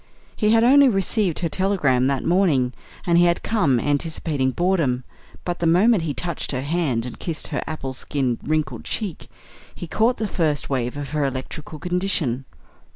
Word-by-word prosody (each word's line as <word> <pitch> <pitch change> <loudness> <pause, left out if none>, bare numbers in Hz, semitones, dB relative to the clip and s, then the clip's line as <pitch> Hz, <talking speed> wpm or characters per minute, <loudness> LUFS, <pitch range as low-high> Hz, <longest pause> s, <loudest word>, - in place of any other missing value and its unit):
He 210 - +1
had 225 +1 +5
only 275 +2 +6
received 195 -3 +1
her 170 - +1
telegram 155 -9 +1
that 135 -1 0
morning, 160 -9 +2 0.3
and 170 -1 +4
he 175 - +5
had 170 0 +1
come 150 - +2
anticipating 145 -1 -1
boredom; 150 -5 0 0.4
but 175 -1 -3
the 170 - +1
moment 195 +5 +4
he 160 -3 -2
touched 170 -2 -3
her 130 0 -2
hand 140 -7 0
and 125 - -8
kissed 165 -3 -4
her - - -2
apple 135 -4 -4
skin 130 -2 -2
wrinkled 150 -6 -2
cheek, 200 -8 -4 0.5
he - - -6
caught 225 +9 +1
the 220 - -2
first 155 -7 -1
wave 125 0 -1
of 140 -2 -6
her 150 -1 0
electrical 140 +3 -5
condition. 175 -7 -1
160 Hz, 170 wpm, -22 LUFS, 135-185 Hz, 0.5 s, only